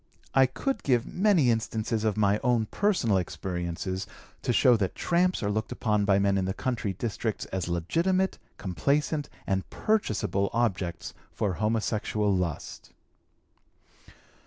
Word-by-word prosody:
"I 135 Hz, -1 st, +6 dB
could 225 Hz, -, -2 dB
give 125 Hz, -4 st, +2 dB
many 180 Hz, -, +3 dB
instances 110 Hz, 0 st, -1 dB
of 110 Hz, -1 st, 0 dB
my 105 Hz, 0 st, +3 dB
own 120 Hz, -3 st, +2 dB
personal 180 Hz, -, +2 dB
experiences 90 Hz, +1 st, -4 dB, 0.3 s
to 125 Hz, -, 0 dB
show 125 Hz, +1 st, +5 dB
that 95 Hz, -4 st, -1 dB
'tramps' 180 Hz, -4 st, +1 dB
are 100 Hz, -, +1 dB
looked 110 Hz, +1 st, -2 dB
upon 105 Hz, -3 st, +1 dB
by 100 Hz, -1 st, +4 dB
men 100 Hz, 0 st, +2 dB
in 95 Hz, -, 0 dB
the 95 Hz, +1 st, -2 dB
country 115 Hz, -6 st, -2 dB
districts 110 Hz, +2 st, -3 dB
as 95 Hz, -2 st, -1 dB
legitimate, 170 Hz, -, 0 dB, 0.2 s
complacent, 145 Hz, -, 0 dB, 0.2 s
and 95 Hz, -1 st, -1 dB
purchaseable 105 Hz, -, 0 dB
objects 95 Hz, -8 st, -1 dB, 0.2 s
for 100 Hz, -3 st, -1 dB
homosexual 105 Hz, 0 st, 0 dB
lust." 85 Hz, -5 st, -4 dB
110 Hz, 135 wpm, -28 LUFS, 95-130 Hz, 0.3 s, I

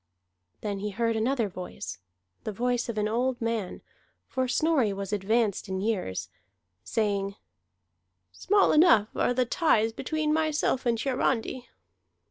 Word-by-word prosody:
Then 205 Hz, -2 st, -3 dB
he 210 Hz, +1 st, -3 dB
heard 230 Hz, +2 st, 0 dB
another 230 Hz, +1 st, +1 dB
voice, 180 Hz, -, -7 dB, 0.4 s
the 215 Hz, -, -3 dB
voice 245 Hz, +3 st, -1 dB
of 225 Hz, -, -4 dB
an 210 Hz, 0 st, +1 dB
old 245 Hz, +3 st, 0 dB
man 225 Hz, -5 st, -3 dB, 0.4 s
for 260 Hz, -1 st, -1 dB
Snorri 275 Hz, -4 st, +2 dB
was 195 Hz, +1 st, -5 dB
advanced 210 Hz, 0 st, 0 dB
in 190 Hz, 0 st, -2 dB
years 195 Hz, -, -2 dB, 0.6 s
saying: 200 Hz, -3 st, -1 dB, 1.0 s
"Small 405 Hz, +1 st, +3 dB
enough 300 Hz, -, +5 dB
are 245 Hz, -, +1 dB
the 255 Hz, 0 st, +2 dB
ties 225 Hz, -5 st, +2 dB
between 310 Hz, +4 st, -1 dB
myself 310 Hz, -4 st, +1 dB
and 230 Hz, -1 st, +2 dB
Hiarandi." 255 Hz, -1 st, -1 dB
230 Hz, 130 wpm, -28 LUFS, 205-260 Hz, 1.0 s, enough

